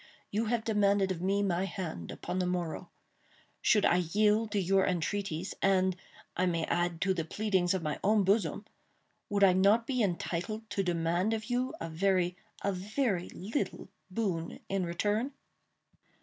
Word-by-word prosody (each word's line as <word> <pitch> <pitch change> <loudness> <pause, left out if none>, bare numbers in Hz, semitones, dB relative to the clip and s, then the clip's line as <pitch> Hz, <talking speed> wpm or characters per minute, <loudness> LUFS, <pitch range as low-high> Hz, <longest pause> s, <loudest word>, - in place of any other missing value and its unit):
You 215 +3 0
have 230 0 0
demanded 200 -3 +2
of 175 -2 -3
me 200 +2 +1
my 185 -1 +1
hand 165 - -5
upon 185 - -4
the 180 - +1
morrow. 175 -3 -3 0.7
Should 210 -1 +4
I 175 - +4
yield 210 +5 +2
to 205 -1 0
your 190 +1 +3
entreaties—and, 185 +1 0 0.4
I 185 - +1
may 170 -2 0
add, 175 0 -1
to 190 0 +2
the 170 -3 -2
pleadings 190 0 +1
of 185 - -2
my 155 -1 -2
own 210 +1 +4
bosom—would 200 +1 -2
I 190 -2 +7
not 200 +5 +4
be 255 -1 0
entitled 200 +3 -2
to 205 - 0
demand 175 +3 +1
of 220 +2 -6
you 250 +1 0
a 165 - -4
very—a 180 +3 -1
very 195 0 -1
little 215 +10 -4 0.2
boon 185 -5 -2
in 195 -2 0
return?" 210 +9 0
190 Hz, 150 wpm, -31 LUFS, 175-210 Hz, 0.7 s, I